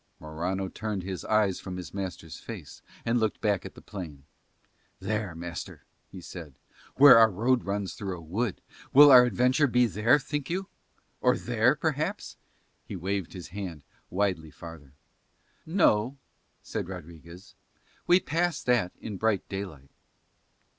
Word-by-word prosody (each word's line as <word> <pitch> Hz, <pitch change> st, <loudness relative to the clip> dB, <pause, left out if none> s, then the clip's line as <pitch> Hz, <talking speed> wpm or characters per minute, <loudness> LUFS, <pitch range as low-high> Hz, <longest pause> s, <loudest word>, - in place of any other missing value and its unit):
Morano 90 Hz, +5 st, -3 dB
turned 105 Hz, -1 st, -4 dB
his 95 Hz, -1 st, -5 dB
eyes 105 Hz, -3 st, +2 dB
from 90 Hz, -1 st, -7 dB
his 90 Hz, -, -8 dB
master's 95 Hz, -4 st, -6 dB
face -, -, -9 dB, 0.2 s
and 120 Hz, +1 st, +2 dB
looked 110 Hz, -2 st, -1 dB
back 100 Hz, -3 st, +1 dB
to -, -, -8 dB
the -, -, -15 dB
plain. 80 Hz, -9 st, -8 dB, 0.8 s
"There, 105 Hz, -5 st, -3 dB
master," 85 Hz, 0 st, -7 dB, 0.3 s
he 95 Hz, -, -10 dB
said, 80 Hz, -5 st, -9 dB, 0.4 s
"where 135 Hz, -4 st, +9 dB
our 115 Hz, -1 st, +7 dB
road 120 Hz, +6 st, +1 dB
runs 100 Hz, -1 st, -2 dB
through 95 Hz, -3 st, -5 dB
a -, -, -10 dB
wood, 95 Hz, +7 st, -3 dB, 0.3 s
will 145 Hz, +1 st, +9 dB
our 125 Hz, -1 st, +9 dB
adventure 125 Hz, +4 st, +2 dB
be 125 Hz, 0 st, +3 dB
there, 110 Hz, +6 st, +3 dB
think 145 Hz, +1 st, -4 dB
you? 185 Hz, +3 st, -2 dB, 0.5 s
Or -, -, +3 dB
there, -, -, +2 dB
perhaps," -, -, -2 dB
and -, -, -41 dB
he -, -, -6 dB
waved 95 Hz, 0 st, -3 dB
his 90 Hz, -3 st, -8 dB
hand 90 Hz, -5 st, -6 dB, 0.3 s
widely 90 Hz, -4 st, -1 dB
farther. 80 Hz, -4 st, -12 dB, 0.7 s
"No," 135 Hz, -, +2 dB, 0.5 s
said 90 Hz, -, -4 dB
Rodriguez, 85 Hz, 0 st, -11 dB, 0.5 s
"we 175 Hz, +1 st, +6 dB
pass 170 Hz, -1 st, -1 dB
that 120 Hz, -8 st, +1 dB
in 105 Hz, -3 st, -6 dB
bright 110 Hz, -1 st, 0 dB
daylight." 90 Hz, -9 st, -7 dB
100 Hz, 145 wpm, -28 LUFS, 90-120 Hz, 0.8 s, where